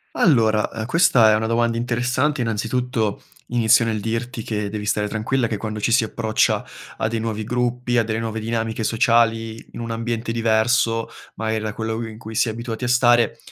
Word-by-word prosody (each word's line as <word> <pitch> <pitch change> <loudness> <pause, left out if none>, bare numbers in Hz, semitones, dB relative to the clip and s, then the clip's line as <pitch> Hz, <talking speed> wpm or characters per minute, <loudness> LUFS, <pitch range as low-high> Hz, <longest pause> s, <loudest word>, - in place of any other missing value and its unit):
Allora, 110 -8 +3
ehm, 110 -1 -4
questa 125 - +5
è 110 - +4
una 110 +1 -1
domanda 115 0 +1
interessante, 125 +4 0
innanzitutto, 115 -1 -1 0.3
inizio 115 -1 +4
nel 110 -2 -1
dirti 115 +2 -3
che 105 -2 -3
devi 105 0 -5
stare 105 0 0
tranquilla 115 +4 -1
che 110 -2 -2
quando 110 +1 -5
ci 115 - 0
si 125 - +5
approccia 110 0 0 0.3
a - - -1
dei 115 0 -2
nuovi 110 -1 -3
gruppi, 125 +1 -1
a 115 - +4
delle 110 0 -2
nuove 110 -1 -3
dinamiche 115 0 -2
sociali, 115 0 +1
in - - -10
un 115 -1 -4
ambiente 115 0 -3
diverso, 115 0 +2 0.3
magari 110 0 -2
a 105 -1 -3
quello 110 +1 -3
in 110 0 -10
cui 110 -1 -9
si 115 - +2
è - - -1
abituati 115 +1 -6
a 125 - -1
stare, 120 -1 +3
115 Hz, 190 wpm, -21 LUFS, 110-120 Hz, 0.3 s, questa